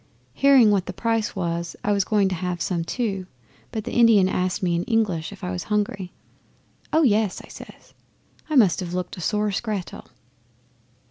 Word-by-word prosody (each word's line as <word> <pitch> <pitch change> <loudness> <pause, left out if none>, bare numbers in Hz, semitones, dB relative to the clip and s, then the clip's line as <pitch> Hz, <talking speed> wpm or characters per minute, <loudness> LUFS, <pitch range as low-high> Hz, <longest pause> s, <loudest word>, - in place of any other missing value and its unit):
Hearing 260 - +5
what 195 -3 +1
the 185 - -4
price 225 -1 -1
was 170 -2 -3
I 210 - +1
was 200 -2 +2
going 205 -2 +2
to - - -2
have 180 0 -3
some 170 0 -1
too, 195 -2 -3 0.4
but 220 - -4
the 240 - -6
Indian 225 -5 +5
asked 185 0 -1
me 175 -2 +1
in 170 - -1
English 210 -9 0
if - - -12
I 90 - -3
was 90 - -4
hungry. 205 -3 -2 0.8
"Oh 320 +1 +3
yes!" 215 -6 +2
I - - -13
says. - - -13 0.6
I 310 - -1
must 210 -10 +5
have 180 -2 -4
looked 180 0 -4
a - - -7
sore 210 +4 0
scrattel. 200 -2 -4
200 Hz, 185 wpm, -23 LUFS, 180-220 Hz, 0.8 s, Hearing